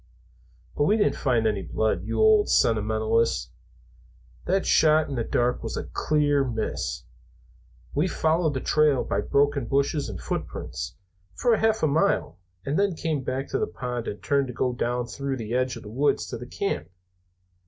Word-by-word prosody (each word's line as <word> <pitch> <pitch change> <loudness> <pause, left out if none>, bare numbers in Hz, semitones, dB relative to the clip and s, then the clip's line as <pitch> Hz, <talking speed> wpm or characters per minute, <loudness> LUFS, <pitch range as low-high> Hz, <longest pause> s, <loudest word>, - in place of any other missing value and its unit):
"But 145 - +2
we 210 +7 +3
didn't 205 - +2
find 120 -5 +1
any 105 -3 +1
blood, 110 +5 -1
you - - -2
old 435 -1 +5
sentimentalist. 110 +1 +1 0.9
That 190 +2 +1
shot 155 0 +4
in 140 - -5
the 120 -3 -1
dark 120 +2 0
was - - -4
a - - -2
clear 145 -2 +1
miss. 115 -4 -3 0.9
We 150 +6 +1
followed 160 -3 +1
the 130 - -2
trail 150 -3 +3
by - - -1
broken 140 -2 +1
bushes 140 0 0
and 100 - -6
footprints, - - -5 0.4
for 240 -2 +3
half 220 -2 +1
a - - +5
mile, 155 - +1 0.3
and 145 +6 0
then 200 -3 +1
came 155 -3 -2
back 130 +2 -3
to - - -1
the - - 0
pond 120 +6 -5
and 105 - -6
turned 140 -2 +1
to 125 - -6
go 125 +2 0
down 120 0 -1
through 135 +2 -4
the 115 -1 -5
edge 130 0 0
of - - -9
the 105 - -9
woods 140 +5 +1
to - - -4
the - - -8
camp. - - -3
135 Hz, 175 wpm, -25 LUFS, 115-155 Hz, 0.9 s, old